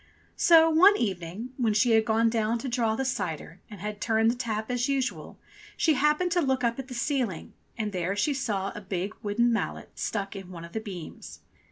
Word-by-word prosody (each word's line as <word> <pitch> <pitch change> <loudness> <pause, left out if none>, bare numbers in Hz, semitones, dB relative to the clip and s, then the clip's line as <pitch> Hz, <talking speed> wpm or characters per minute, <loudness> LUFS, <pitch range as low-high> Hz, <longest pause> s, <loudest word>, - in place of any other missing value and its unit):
So 325 -1 +6
one 365 +6 +6
evening 195 +3 -3
when 225 -5 +1
she 230 +3 +3
had 220 -1 +4
gone 225 0 +3
down 225 0 0
to 265 - -5
draw 235 -3 0
the 265 - -2
cider 180 - -4
and 210 - -10
had 210 0 -5
turned 225 0 +3
the - - -4
tap 220 -2 -3
as 245 +2 0
usual, 270 -2 -2 0.4
she 320 - +3
happened 300 +6 +2
to 350 - +2
look 265 -3 0
up 235 +1 0
at 265 - -6
the 255 - -7
ceiling, 240 - -2 0.2
and 215 -2 -2
there 185 +1 -2
she 285 +8 +1
saw 205 -8 -2
a 210 - -8
big 195 +1 -3
wooden 235 +3 +1
mallet 230 - -3
stuck 200 -2 -3
in 195 -2 -8
one 170 -2 -8
of 170 - -14
the 220 - -1
beams. 185 -7 -9
225 Hz, 210 wpm, -27 LUFS, 200-260 Hz, 0.4 s, So